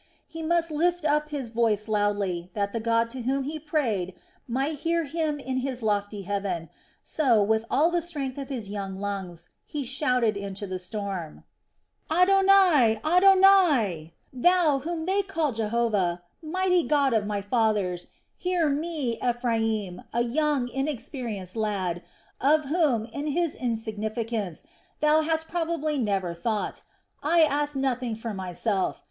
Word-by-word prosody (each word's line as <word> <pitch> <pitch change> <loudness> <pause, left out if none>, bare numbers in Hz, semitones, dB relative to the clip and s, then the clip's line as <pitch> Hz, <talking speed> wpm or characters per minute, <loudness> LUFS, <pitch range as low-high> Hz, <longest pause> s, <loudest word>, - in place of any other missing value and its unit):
He 325 - -8
must 335 0 +1
lift 345 +2 0
up 300 0 +1
his 275 -6 -4
voice 225 -2 +1
loudly, 205 -4 0
that 200 -1 -1
the 230 - -1
God 230 +1 +2
to 260 - -6
whom 265 +3 0
he 305 +3 -4
prayed 235 - -1 0.3
might 270 +5 -1
hear 335 +1 0
him 310 0 -2
in 260 -1 -3
His 255 -2 -3
lofty 205 -1 -1
heaven, 190 -4 -3 0.3
so, 245 -9 +2
with 220 +2 +1
all 320 +4 +3
the 345 0 +1
strength 285 -6 -4
of 275 -1 -6
his 240 -7 -4
young 195 -1 -5
lungs, 195 -4 -5
he 295 -2 -4
shouted 250 -4 +1
into 200 0 -5
the 185 -1 -4
storm: 185 -4 -5 0.7
"Adonai, 365 - +5
Adonai! 350 - +5 0.2
Thou, 315 +1 +3
whom 320 +3 -4
they 390 +3 +2
call 330 -7 -1
Jehovah, 215 -6 0 0.2
mighty 360 +2 +2
God 285 -4 +2
of 210 -2 +1
my 205 -1 -1
fathers, 205 -5 0 0.3
hear 355 -4 0
me, 290 -5 -2
Ephraim, 225 -6 -1
a 235 - +1
young 280 +1 0
inexperienced 245 - -4
lad, 195 -6 -1 0.4
of 305 +2 +3
whom, 280 -7 +1
in 285 +5 -5
his 335 +2 0
insignificance, 220 -4 -3 0.4
Thou 305 +1 +4
hast 320 0 0
probably 325 -3 -1
never 195 -6 0
thought. 215 +5 -2 0.4
I 330 +3 +4
ask 295 -1 +2
nothing 255 -3 -1
for 225 0 -5
myself. 190 +1 -1
245 Hz, 140 wpm, -26 LUFS, 205-310 Hz, 0.7 s, Adonai